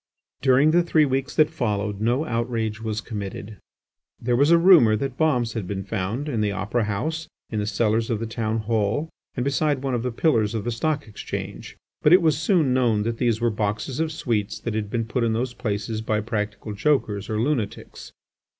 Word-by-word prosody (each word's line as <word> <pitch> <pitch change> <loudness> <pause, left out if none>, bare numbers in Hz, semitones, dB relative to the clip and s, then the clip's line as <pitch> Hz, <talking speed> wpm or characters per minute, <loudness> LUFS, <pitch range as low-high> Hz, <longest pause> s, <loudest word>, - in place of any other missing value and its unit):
During 135 +3 +5
the 175 +2 +5
three 160 -3 +3
weeks 135 +1 -2
that 155 -1 +4
followed 105 -8 -2
no 120 +7 +1
outrage 115 -4 -2
was 110 -1 -3
committed. 105 -2 -6 0.6
There 120 +1 0
was 140 +5 +4
a 170 - +7
rumour 165 - +6
that 130 +4 -3
bombs 125 -7 +1
had 110 -6 -4
been 95 0 -3
found 100 +9 -3
in 120 -7 -1
the 105 -1 +1
Opera 105 +3 -1
House, 155 +11 -3 0.2
in 110 - -1
the 105 - -2
cellars 110 +1 +1
of 115 -3 0
the 115 - -3
Town 115 -1 -2
Hall, 110 +7 -1 0.2
and 125 - -1
beside 140 0 +1
one 135 -2 -1
of 120 - 0
the 125 +1 -2
Pillars 115 -5 +1
of 110 - -2
the 120 - -2
Stock 145 +5 -1
Exchange. 105 - -7 0.2
But 150 - +5
it 185 - +7
was 155 -2 +4
soon 155 -3 +2
known 120 -5 +2
that 115 +1 -3
these 115 -3 +1
were 120 0 +1
boxes 105 +6 -2
of 160 -1 0
sweets 105 -8 -2
that 115 - -3
had 105 -1 -2
been 115 +1 -1
put 120 +2 -1
in 115 -1 +1
those 120 +2 -2
places 110 -1 -3
by 110 -1 0
practical 105 -1 -3
jokers 105 -3 0
or 110 -1 -1
lunatics. 120 -4 -3
115 Hz, 205 wpm, -24 LUFS, 105-140 Hz, 0.6 s, a